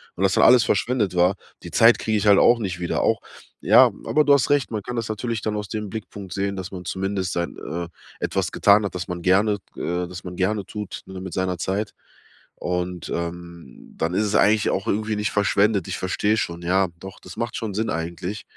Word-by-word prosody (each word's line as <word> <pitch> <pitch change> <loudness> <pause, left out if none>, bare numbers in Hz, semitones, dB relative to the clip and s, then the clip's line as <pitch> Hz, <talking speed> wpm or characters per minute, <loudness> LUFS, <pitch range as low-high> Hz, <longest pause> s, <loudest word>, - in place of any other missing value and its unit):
und 95 - -2
das 95 -1 +3
dann - - +4
alles 125 -2 +7
verschwendet 115 -2 0
war, 90 +2 +3 0.3
die - - -8
Zeit 115 +1 +6
kriege 110 -1 0
ich 105 - -1
halt 100 -1 +7
auch 120 0 +5
nicht 95 -5 -3
wieder 85 - -1
auch - - +2 0.4
ja, - - +6
aber 150 - +3
du 145 - +6
hast 140 -1 +3
recht, 145 -2 +2
man 110 -2 -2
kann 125 - -5
das 115 -2 -3
natürlich 110 +1 -3
dann 105 0 -2
aus 105 -1 -4
dem 105 -2 -4
Blickpunkt 100 -3 -8
sehen, 100 0 -2
dass 95 -1 -6
man 90 -2 -8
zumindest 95 0 -2
sein 85 0 -3
äh, 85 +2 -5 0.3
etwas - - -1
getan 105 +1 +5
hat, 100 - -5
das 90 -2 -4
man 90 -1 -4
gerne 100 +4 +3 0.2
äh, 90 +1 -2
das 90 +1 -9
man 90 -1 -7
gerne 100 +1 0
tut, 105 -2 -7
ne, 95 -1 -8
mit 95 -3 -7
seiner 95 -1 -1
Zeit. 100 +4 -2 0.6
Und, 90 0 -3
ähm, 85 -4 -8
dann 80 +2 -1
ist 105 +3 +1
es 105 +1 -1
eigentlich 105 +1 +4
auch 95 - -1
irgendwie 110 +1 0
nicht 105 -1 -1
verschwendet. 100 -1 +2
Ich - - -3
verstehe 105 +3 0
schon, 85 -4 -3
ja. 95 +2 +2
Doch, 95 +1 -10
das - - -11
macht 115 -1 -3
schon 110 -3 -4
Sinn 110 +3 -1
eigentlich. 85 +5 -4
100 Hz, 225 wpm, -23 LUFS, 90-105 Hz, 0.6 s, alles